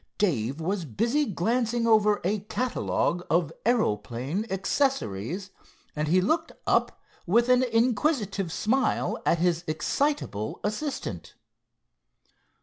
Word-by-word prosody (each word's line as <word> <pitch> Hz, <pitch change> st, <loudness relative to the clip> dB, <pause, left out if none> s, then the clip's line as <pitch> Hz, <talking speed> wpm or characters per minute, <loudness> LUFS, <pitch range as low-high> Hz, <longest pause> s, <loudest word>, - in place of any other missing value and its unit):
Dave 140 Hz, -, 0 dB
was 185 Hz, +3 st, -1 dB
busy 235 Hz, -, +1 dB
glancing 230 Hz, +3 st, 0 dB
over 210 Hz, -2 st, +4 dB
a 205 Hz, +4 st, 0 dB
catalogue 210 Hz, -4 st, -1 dB
of 165 Hz, -2 st, +1 dB
aeroplane 140 Hz, -, 0 dB
accessories, 190 Hz, -, -1 dB, 0.4 s
and 150 Hz, 0 st, -1 dB
he 180 Hz, +4 st, +4 dB
looked 320 Hz, -, 0 dB
up -, -, +1 dB, 0.2 s
with 235 Hz, +7 st, +3 dB
an 250 Hz, 0 st, +5 dB
inquisitive 230 Hz, -, +1 dB
smile 250 Hz, +9 st, 0 dB
at 170 Hz, -, +4 dB
his 170 Hz, 0 st, +1 dB
excitable 155 Hz, -, -1 dB
assistant. 240 Hz, +8 st, -4 dB
205 Hz, 105 wpm, -27 LUFS, 165-240 Hz, 0.4 s, an